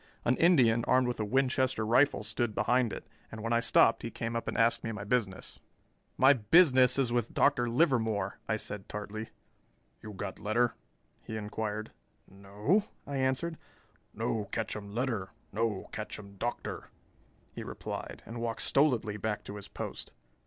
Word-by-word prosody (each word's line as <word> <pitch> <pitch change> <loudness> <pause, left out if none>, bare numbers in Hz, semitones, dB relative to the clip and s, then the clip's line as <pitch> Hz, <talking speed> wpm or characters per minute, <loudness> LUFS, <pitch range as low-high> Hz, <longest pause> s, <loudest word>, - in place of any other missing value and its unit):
An 125 - +3
Indian 125 -10 +4
armed 130 0 +3
with 125 - -3
a - - 0
Winchester 130 0 +1
rifle 125 +1 +3
stood 110 0 -2
behind 120 -1 +2
it, - - -7 0.3
and 110 0 -7
when 115 +1 0
I 115 - +4
stopped 115 -1 +4
he 115 - -4
came 115 0 -4
up 115 - -3
and - - -2
asked 115 +1 +3
my 110 -2 -4
business. 100 -3 -2 0.6
"My 135 +2 +7
business 130 - +5
is 125 -3 +1
with 120 -2 -1
Dr. 120 -4 +3
Livermore," 110 - +1
I 110 - +2
said 105 -2 -6
tartly. 105 +1 -5 0.7
"You 105 - -8
got 95 - -6
letter?" 110 +3 +1 0.5
he 110 - -6
inquired. 105 0 -4 0.4
"No," 105 - 0 0.2
I 140 -1 -4
answered. 130 +5 0 0.5
"No 110 -2 -2
ketchum 105 0 -4
letter, 115 -7 -2 0.2
no 110 -1 -1
ketchum 100 -1 -7
Doctor," 120 +4 -4 0.6
he - - -6
replied, - - -6
and 115 +1 -7
walked 115 -1 -1
stolidly 120 -7 +2
back 105 0 -3
to 100 - -8
his 100 -1 -8
post. - - -7
115 Hz, 155 wpm, -31 LUFS, 105-125 Hz, 0.7 s, My